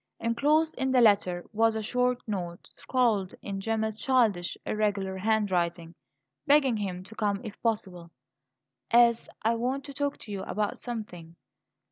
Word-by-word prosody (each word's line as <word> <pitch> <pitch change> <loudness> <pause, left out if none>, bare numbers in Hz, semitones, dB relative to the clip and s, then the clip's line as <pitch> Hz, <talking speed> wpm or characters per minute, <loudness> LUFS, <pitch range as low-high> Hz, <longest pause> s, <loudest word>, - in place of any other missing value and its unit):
Enclosed 295 +7 +2
in 265 - +1
the 260 -1 +4
letter 200 -6 +3
was 225 +1 +3
a 220 - -2
short 250 +2 +1
note, 180 -5 -5
scrawled 225 -7 0
in 195 -1 -4
Gemma's 220 +1 -1
childish, 220 -7 +1
irregular 205 -3 -1
handwriting, 185 -5 0 0.5
begging 280 -5 +4
him 185 -3 -4
to 200 - -12
come 205 -2 -1
if 215 -3 -9
possible, 190 -7 -2 0.8
"as 235 -1 +4
I 225 +2 +3
want 255 +4 -2
to 280 0 -9
talk 285 0 -2
to 210 - -9
you 195 -2 -4
about 210 +2 -2
something." 180 -9 -7
215 Hz, 145 wpm, -28 LUFS, 190-240 Hz, 0.8 s, the